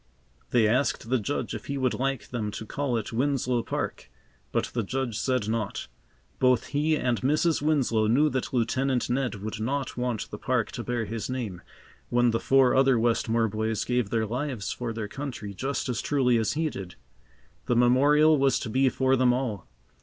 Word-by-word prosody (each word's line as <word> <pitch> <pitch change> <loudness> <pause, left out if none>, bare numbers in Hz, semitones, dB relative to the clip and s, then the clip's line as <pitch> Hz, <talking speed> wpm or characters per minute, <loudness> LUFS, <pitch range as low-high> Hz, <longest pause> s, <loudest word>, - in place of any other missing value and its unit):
They 115 -3 +4
asked 125 0 0
the 130 - +3
Judge 125 +7 -3
if - - -7
he 140 - -2
would 130 -2 +1
like 135 -5 -2
them 110 -4 -3
to 110 - -6
call 135 +1 -1
it 110 +1 -5
Winslow 125 -1 +1
Park, - - -4 0.4
but - - -1
the 120 - 0
Judge 120 +1 -3
said 125 -5 0
not. 110 -2 -2 0.5
Both 125 -1 +3
he 150 +2 +1
and 125 -5 0
Mrs. 155 +4 +2
Winslow 130 -8 +2
knew 135 +8 +4
that 130 0 -2
Lieutenant 125 +1 0
Ned 125 -2 0
would 105 +2 -6
not 135 +4 -2
want 125 -3 -2
the - - -6
park - - 0
to - - -5
bear 120 -2 -2
his 110 +3 -4
name, 115 -9 -4 0.5
when 120 0 +3
the 115 - 0
four 135 -2 +4
other 135 -1 +4
Westmore 115 0 +1
boys 110 0 -1
gave 125 -4 0
their 110 0 0
lives 125 -1 -3
for 120 -2 -4
their 110 -2 -4
country 125 -4 -6
just 135 +8 -3
as 125 -3 -2
truly 125 -5 +2
as 110 - 0
he 155 0 -1
did. 90 -2 -8 0.7
The 120 - +2
memorial 145 +5 +5
was 135 -1 +3
to 110 - -4
be 130 +3 +3
for 130 +1 +2
them 125 -1 +4
all. 120 -6 -2
125 Hz, 190 wpm, -27 LUFS, 115-135 Hz, 0.7 s, memorial